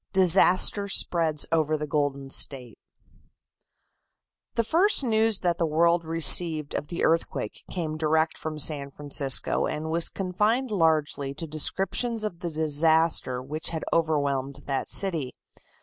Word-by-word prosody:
Disaster 190 +2 +4
Spreads 165 -5 0
Over 155 -1 0
the 150 - -5
Golden 145 -2 -3
State 125 -6 -4 1.8
The 230 - +1
first 340 - +2
news 220 -3 0
that 175 -1 -1
the 170 - +1
world 170 +2 +1
received 160 -1 +4
of 145 - -4
the 170 - -5
earthquake 165 +1 -2
came 160 -4 -5
direct 160 +1 0
from 155 -1 -7
San 145 -2 +2
Francisco 140 -1 +3
and 155 +1 -5
was 165 0 +2
confined 210 +7 -2
largely 155 -6 -1
to 165 - -6
descriptions 195 - -2
of 180 -6 -5
the 175 - -5
disaster 155 -4 0
which 150 +4 -4
had 160 -1 -6
overwhelmed 145 -4 -2
that 135 -1 -4
city. 165 -10 -1
160 Hz, 135 wpm, -25 LUFS, 145-180 Hz, 1.8 s, Disaster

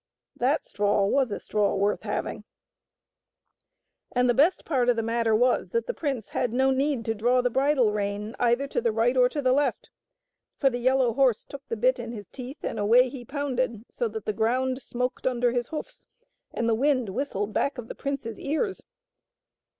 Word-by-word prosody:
That 265 +5 +1
straw 205 -1 +1
was 260 +5 +2
a 205 - -4
straw 210 -1 0
worth 200 +1 +1
having - - -3 1.8
I - - +2
And 250 - +4
the 245 - +4
best 300 +9 +3
part 255 -6 +1
of 245 - +4
the 225 - -1
matter 230 -1 +1
was 245 +3 +2
that 465 0 +1
the - - -3
prince 270 - -3
had 245 - -1
no 265 +2 +3
need 270 -2 0
to 225 - 0
draw 240 +4 +2
the 245 0 0
bridle 265 -3 +3
rein 210 +1 -3
either 240 +3 +2
to - - -1
the 230 -1 +1
right 230 +3 +2
or 250 -1 +5
to 290 +2 -3
the 255 - +3
left; 285 +2 0 0.7
for 270 -2 +3
the 245 - -3
yellow 255 -1 +2
horse 255 -4 +2
took 280 - -10
the 460 - -3
bit - - +2
in 235 - -5
his 205 -4 -8
teeth 265 +3 -9
and 220 - -3
away 240 +5 +5
he 250 -1 -8
pounded 255 -4 -2
so 240 - -1
that 220 -1 -6
the 215 - -1
ground 255 +5 0
smoked 250 +1 -3
under 245 -1 +1
his 240 -1 -1
hoofs, 320 +11 -7 0.4
and 235 - -2
the 230 - +3
wind 255 -1 +1
whistled 210 -2 -3
back 280 - 0
of 240 -2 -7
the - - -6
prince's 275 -6 -4
ears. 350 +8 -2
245 Hz, 200 wpm, -26 LUFS, 225-270 Hz, 1.8 s, or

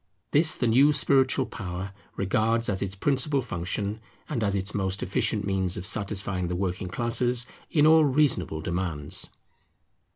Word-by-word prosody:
This 155 +2 +4
the - - -1
new 130 +6 +5
spiritual 135 -2 +3
power 95 -3 -6 0.2
regards 110 +4 +1
as 95 -2 -1
its 95 -1 -3
principal 140 +6 +1
function, 100 -1 -3 0.3
and 120 -7 -2
as 100 -1 0
its 95 +1 -3
most 95 -1 -1
efficient 100 +2 0
means 95 -2 -1
of 90 - -4
satisfying 100 -3 0
the 90 - -3
working 90 0 -2
classes 120 +4 0 0.2
in 150 -2 +3
all 160 0 +6
reasonable 130 - +1
demands. 85 -3 -2
100 Hz, 150 wpm, -26 LUFS, 95-130 Hz, 0.3 s, all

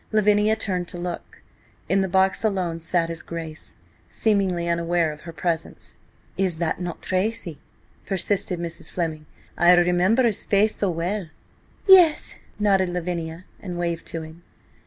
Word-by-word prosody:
Lavinia 210 0 +3
turned 185 -5 -2
to 175 - -7
look. 175 0 -6 0.4
In 195 +4 +2
the 190 - 0
box, 190 +2 +2
alone, 185 -6 0
sat 165 0 0
his 165 -1 -3
Grace, 160 -2 -8 0.3
seemingly 190 -5 +1
unaware 170 -1 +1
of 150 0 -11
her - - -5
presence. 165 -1 -4 0.4
"Is 180 -4 0
it 170 -1 -1
not 175 -1 -5
Tracy?" 185 -5 -2 0.5
persisted 190 -1 -1
Mrs. 170 -1 -6
Fleming. 160 -3 -3 0.3
"I 175 +1 +7
remember 180 +7 +3
his 225 -4 +1
face 210 +2 +3
so 200 - 0
well." 180 +3 -2 0.6
"Yes," 360 -5 +6 0.2
nodded 195 -3 +2
Lavinia, 175 -1 -4
and 180 -3 -6
waved 170 -1 -2
to 165 -1 -4
him. 160 +2 -12
175 Hz, 145 wpm, -24 LUFS, 170-195 Hz, 0.6 s, I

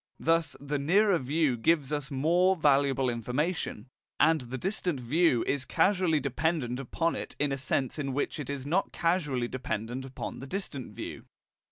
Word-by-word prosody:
Thus 165 0 +2
the 145 +1 -2
nearer 185 +5 +3
view 145 0 +1
gives 145 +3 +1
us 145 -1 -2
more 170 +7 +3
valuable 140 -4 +3
information, 125 - -2 0.3
and 160 -2 +4
the 125 +1 -6
distant 180 - -1
view 130 +1 +2
is 140 -1 0
causally 180 -4 +2
dependent 140 -2 -1
upon 165 +6 -1
it - - -5
in 145 -1 +1
a 135 - -1
sense 135 +2 -1
in 140 -2 -2
which 145 +3 -2
it 145 - -5
is 140 -2 -4
not 175 +7 0
causally 150 -8 0
dependent 125 0 -4
upon 135 0 -6
the 135 - -8
distant 150 -7 -5
view. - - -7
145 Hz, 165 wpm, -29 LUFS, 130-165 Hz, 0.3 s, and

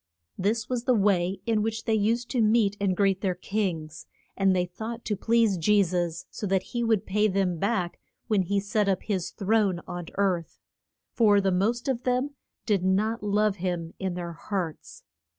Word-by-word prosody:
] 85 - -52
This 225 0 -2
was 250 -1 -2
the 255 - +4
way 195 -3 +1
in 225 -2 +1
which 220 +1 -2
they 225 - +1
used 225 +3 +1
to 245 - +1
meet 215 -2 +3
and 190 -3 +1
greet 195 -2 +2
their 185 -3 0
kings, 175 -5 -3 0.3
and 195 -1 +3
they 180 -1 +1
thought 220 +6 -7
to 210 - 0
please 225 -2 +2
Je 205 +5 +4
sus 175 -2 -2
so 210 - -4
that 190 -1 +1
he 240 -1 0
would 225 -3 +1
pay 210 +2 +2
them 190 -4 0
back 195 -4 -1 0.3
when 210 -4 +2
he 200 +2 0
set 205 +1 0
up 190 - 0
his 190 -5 -2
throne 200 -3 +1
on 175 -1 -6
earth. 185 -4 0 0.6
For 210 -4 +5
the 195 -1 +1
most 220 +8 0
of 255 -3 0
them 255 +3 0 0.3
did 200 -5 +1
not 210 +5 +1
love 210 0 +1
him 175 -2 -3
in 190 -2 -2
their 170 -1 -5
hearts. 170 -1 -5
200 Hz, 190 wpm, -27 LUFS, 180-220 Hz, 0.6 s, For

